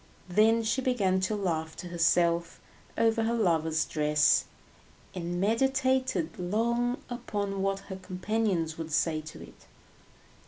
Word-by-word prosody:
Then 220 +5 +4
she 230 +4 0
began 205 -8 +1
to 190 +3 -1
laugh 160 -5 -2
to 180 - -7
herself 170 0 +1 0.4
over 225 0 +2
her 225 +1 0
lover's 160 -6 +1
dress, 150 -1 +3 0.7
and 175 -1 -4
meditated 260 -4 +1
long 235 +7 0
upon 200 -5 -3
what 195 0 -1
her 190 -1 -8
companions 185 -3 -2
would 160 -1 -5
say 155 0 +1
to 155 0 -10
it. - - -16
190 Hz, 125 wpm, -29 LUFS, 165-225 Hz, 0.7 s, Then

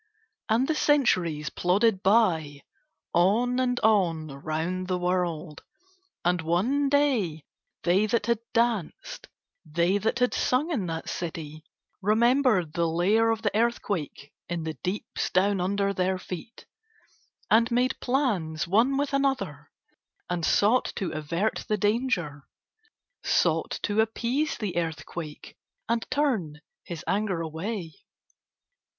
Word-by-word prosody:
And 235 +5 +2
the 315 - +2
centuries 180 - +2
plodded 195 +2 +2
by, 165 -9 +2 0.5
on 225 +8 +3
and 250 -1 +1
on 175 -8 +2
round 160 +6 -3
the 185 0 0
world, 175 -4 -2 0.6
and 180 -1 +2
one 230 - +1
day 245 - +1 0.4
they 190 +5 +3
that 215 0 0
had 235 -1 +1
danced, 230 -7 -1 0.4
they 170 +5 +1
that 220 +3 0
had 250 0 +2
sung 285 +7 +1
in 215 - -1
that 165 +1 -4
city, 160 -3 -5 0.4
remembered 220 - +3
the 170 -1 +1
lair 200 +8 +2
of 225 0 -1
the 205 -1 0
earthquake 200 - -1 0.2
in 170 -1 -2
the 160 0 -3
deeps 180 - -3
down 195 +1 +2
under 200 +2 0
their 185 0 0
feet, 185 +5 -8 0.9
and 230 +2 +5
made 250 +2 +1
plans 200 - 0
one 230 +9 +3
with 285 0 -1
another 265 - -1 0.6
and 175 -1 -2
sought 215 +9 +3
to 190 - -3
avert 165 +7 -2
the 215 - +1
danger, 205 - -1 0.8
sought - - +1
to 210 +1 +2
appease 245 +7 -1
the 205 -5 -4
earthquake 160 -1 -5 0.3
and 230 0 -1
turn 235 - 0 0.2
his 170 -2 -7
anger 195 -4 0
away. 165 +2 -4
195 Hz, 125 wpm, -27 LUFS, 165-235 Hz, 0.9 s, and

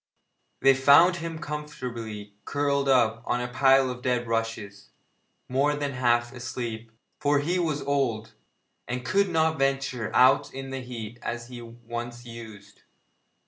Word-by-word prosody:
They 135 - +7
found 145 +7 +6
him 165 -1 -5
comfortably 120 -9 -6
curled 140 -1 0
up 115 -4 +3
on 120 - -1
a 125 - -2
pile 135 +1 +4
of 125 0 -8
dead 125 -1 0
rushes, 115 -3 -3 0.6
more 140 +3 +1
than 145 -1 -2
half 120 -2 +1
asleep, 120 -2 -5 0.3
for 145 -1 +2
he 170 +6 0
was 155 -4 -1
old, 120 -6 -1 0.5
and 125 0 -4
could 200 +6 +2
not 160 -2 +1
venture 135 -4 0
out 130 +2 +5
in 135 0 -6
the 135 0 -4
heat 120 -2 -7
as 120 0 -5
he 125 -1 -8
once 120 +1 -7
used. 110 -4 -11
125 Hz, 145 wpm, -26 LUFS, 115-140 Hz, 0.6 s, They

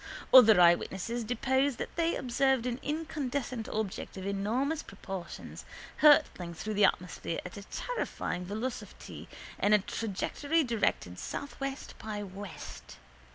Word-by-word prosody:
Other 225 -6 +9
eyewitnesses 190 +6 +3
depose 265 +4 +1
that - - -6
they 335 0 +1
observed 260 0 +1
an 245 0 -2
incandescent 285 -6 -3
object 215 -3 -3
of 190 - -6
enormous 230 +11 0
proportions 190 -2 -8 0.3
hurtling 290 - +5
through 215 +6 -4
the 205 -1 +5
atmosphere 180 -2 -1
at 180 - -7
a 200 - -7
terrifying 470 - -3
velocity 220 +7 -6 0.3
in 205 - +3
a - - +8
trajectory 230 - -1
directed 210 - -1
southwest 275 -1 -5
by 210 -1 -4
west. 195 -1 -9
230 Hz, 120 wpm, -31 LUFS, 195-270 Hz, 0.3 s, Other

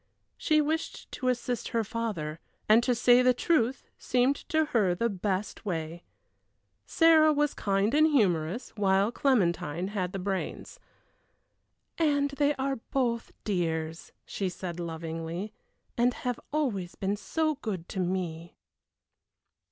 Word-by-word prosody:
She 310 -1 +2
wished 315 +2 -3
to 255 - -4
assist 245 -1 -1
her 230 -1 0
father, 200 -9 -4 0.3
and 220 +2 +6
to 245 0 +1
say 245 +2 +5
the 250 0 +4
truth 265 -3 +1 0.2
seemed 255 +2 +2
to 315 0 +2
her 195 -7 +3
the 235 +6 0
best 195 +1 -3
way. 165 -4 -4 0.9
Sarah 320 -2 +5
was 295 -1 +1
kind 200 +3 0
and 310 +1 +5
humorous, 200 - +1
while 200 0 +2
Clementine 180 - +1
had 185 -4 -2
the 195 - -4
brains. 195 - -4 1.2
"And 285 -3 +2
they 285 +1 +1
are 270 0 -1
both 235 -1 -2
dears," 165 -4 -2
she 195 -2 -3
said, 175 -1 -6
lovingly, 165 +3 -5 0.4
"and 245 +1 +2
have 245 -1 -3
always 220 - -1
been 195 +1 -1
so 310 +9 -1
good 185 -6 -4
to 190 - -4
me." 175 -2 -3
215 Hz, 130 wpm, -28 LUFS, 180-265 Hz, 1.2 s, and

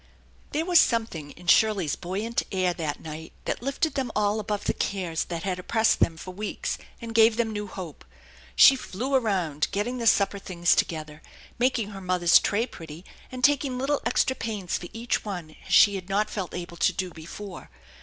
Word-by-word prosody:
There 310 +3 -1
was 350 -2 +6
something 220 - 0
in 175 +4 -14
Shirley's 195 -4 +3
buoyant 205 +6 -2
air 185 -2 +1
that 155 -4 -4
night 160 +1 -8
that - - -2
lifted 275 +5 -1
them 260 -4 -2
all 210 0 +1
above 210 -1 -3
the - - +1
cares 180 -5 -2
that 170 -2 -5
had 185 -2 -2
oppressed 220 +4 +2
them 165 - +2
for 185 +2 -8
weeks, 210 +3 -4 0.2
and 230 -1 -7
gave 225 0 +5
them 225 -2 0
new 210 0 -4
hope. 180 -5 -8 0.5
She 275 - +8
flew 255 +2 -4
around, 185 - +1
getting 240 +5 -2
the 230 - 0
supper 200 -1 +3
things 175 -3 +1
together, 155 -2 -2 0.4
making 240 -4 +1
her 195 -2 -8
mother's 180 -2 +5
tray 215 +3 0
pretty, 165 -5 -11 0.3
and 255 -1 -7
taking 275 -2 +3
little 275 +3 0
extra 260 - +1
pains 210 -7 -3
for 175 - -4
each 230 +1 -2
one 175 -7 -6
as - - -9
she 205 - +7
had 190 -1 -6
not 210 +2 0
felt 190 -4 -4
able 175 -1 -6
to 185 - +2
do 185 0 -3
before. 175 +4 -9
200 Hz, 190 wpm, -26 LUFS, 175-230 Hz, 0.5 s, She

